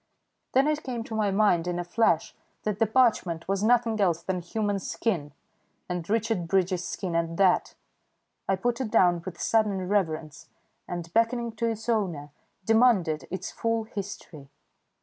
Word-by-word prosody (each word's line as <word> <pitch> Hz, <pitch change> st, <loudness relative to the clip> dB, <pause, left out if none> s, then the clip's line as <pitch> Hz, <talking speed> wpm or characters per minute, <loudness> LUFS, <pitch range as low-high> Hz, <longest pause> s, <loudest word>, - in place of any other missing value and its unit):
Then 270 Hz, +3 st, +4 dB
it 305 Hz, 0 st, 0 dB
came 245 Hz, -3 st, -4 dB
to 225 Hz, -, -9 dB
my 215 Hz, -2 st, +1 dB
mind 195 Hz, -4 st, +2 dB
in 175 Hz, -1 st, -1 dB
a 175 Hz, -, -2 dB
flash 175 Hz, -3 st, +1 dB, 0.3 s
that 210 Hz, -1 st, -2 dB
the 225 Hz, -, +3 dB
parchment 215 Hz, -8 st, +2 dB
was 195 Hz, 0 st, 0 dB
nothing 225 Hz, -1 st, +2 dB
else 170 Hz, -4 st, +1 dB
than 185 Hz, -1 st, -2 dB
human 205 Hz, +3 st, -1 dB
skin, 175 Hz, -6 st, -2 dB, 0.6 s
and 180 Hz, -1 st, -4 dB
Richard 220 Hz, -5 st, 0 dB
Bridges' 185 Hz, 0 st, +1 dB
skin 180 Hz, -4 st, -4 dB
at 165 Hz, 0 st, -1 dB
that. 190 Hz, -2 st, +3 dB, 0.7 s
I 195 Hz, -, +4 dB
put 240 Hz, +6 st, -1 dB
it 245 Hz, -, -2 dB
down 175 Hz, -4 st, +4 dB
with 180 Hz, -2 st, -8 dB
sudden 205 Hz, -5 st, +1 dB
reverence, 160 Hz, -7 st, -2 dB, 0.4 s
and, 170 Hz, -1 st, -6 dB
beckoning 230 Hz, +1 st, +1 dB
to 230 Hz, -, 0 dB
its 225 Hz, 0 st, -4 dB
owner, 175 Hz, -11 st, -1 dB, 0.3 s
demanded 220 Hz, -9 st, +3 dB
its 185 Hz, -1 st, -5 dB
full 230 Hz, -1 st, -1 dB
history. 195 Hz, -, -8 dB
195 Hz, 160 wpm, -27 LUFS, 175-225 Hz, 0.7 s, Then